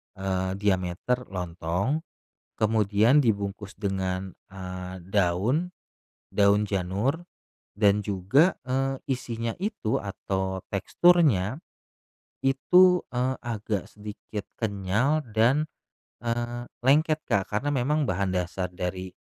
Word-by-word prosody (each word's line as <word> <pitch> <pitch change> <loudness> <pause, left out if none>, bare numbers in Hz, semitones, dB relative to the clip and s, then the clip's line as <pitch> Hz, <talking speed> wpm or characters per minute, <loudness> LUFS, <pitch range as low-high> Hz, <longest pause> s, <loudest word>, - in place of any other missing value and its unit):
eee, 95 -1 -1
diameter 100 +5 0
lontong. 90 - -2 0.6
Kemudian 110 +4 +3
dibungkus 100 -5 0
dengan, 95 -2 -2 0.2
eee, 90 -1 -7
daun 100 - +1 0.6
daun 100 +1 +3
janur, 100 - -1 0.5
dan 105 -1 +4
juga, 105 - +3
eee, 135 +1 0 0.2
isinya 115 -3 -2
itu 200 - -1
atau 95 -1 -3
teksturnya, 135 - +3 0.9
itu, 180 +7 +5
eee, 125 +1 0
agak 110 -4 -3
sedikit 105 0 -7 0.2
kenyal 110 +8 +1
dan, 120 +8 +3 0.6
eee, 120 0 -3 0.2
lengket, 155 +3 +3
Kak. 100 -5 0
Karena 125 +8 -1
memang 145 +3 +1
bahan 95 -4 0
dasar 90 +1 -2
dari 90 +1 -4
105 Hz, 95 wpm, -27 LUFS, 95-130 Hz, 0.9 s, itu